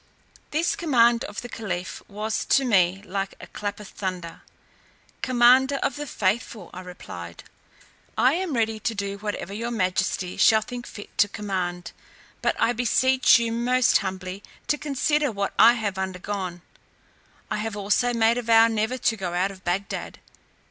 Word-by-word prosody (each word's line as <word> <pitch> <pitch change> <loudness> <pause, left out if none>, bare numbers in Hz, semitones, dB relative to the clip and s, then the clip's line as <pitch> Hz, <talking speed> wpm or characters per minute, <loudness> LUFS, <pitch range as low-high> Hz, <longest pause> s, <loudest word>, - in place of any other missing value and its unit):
This 330 +7 0
command 240 - +3
of - - -6
the - - -6
caliph 190 -6 -5
was 215 +2 -3
to 270 0 +3
me 190 -4 +2
like 195 0 -3
a - - -9
clap 205 0 -5
of 210 - -9
thunder. 180 -4 -5 0.8
"Commander 255 +2 +5
of - - 0
the 295 0 -5
faithful," 210 -2 -2
I 185 - -7
replied, 90 - -9 0.7
"I 255 - +4
am 350 -4 -2
ready 225 -1 0
to 225 +2 -2
do 200 0 -4
whatever 205 -1 -4
your 230 +3 -3
majesty 185 -3 -1
shall 220 -1 +5
think 245 +2 -7
fit 205 - -11
to 205 - +6
command; 185 -4 -4 0.5
but - - +1
I 240 - +3
beseech 255 +3 +4
you 230 -1 -1
most 245 +2 +3
humbly 190 0 -5 0.3
to 295 - +2
consider 295 0 +1
what 200 -2 -2
I 230 +2 +9
have 205 -4 -3
undergone. 185 -1 -4 0.9
I - - 0
have 215 0 -4
also 210 +5 +1
made 230 0 +3
a - - -2
vow 225 -1 +6
never 220 +2 -1
to 230 -2 +1
go 180 -4 -4
out 190 +3 +1
of 190 -1 -14
Bagdad." 185 +3 -3
215 Hz, 160 wpm, -25 LUFS, 190-240 Hz, 0.9 s, I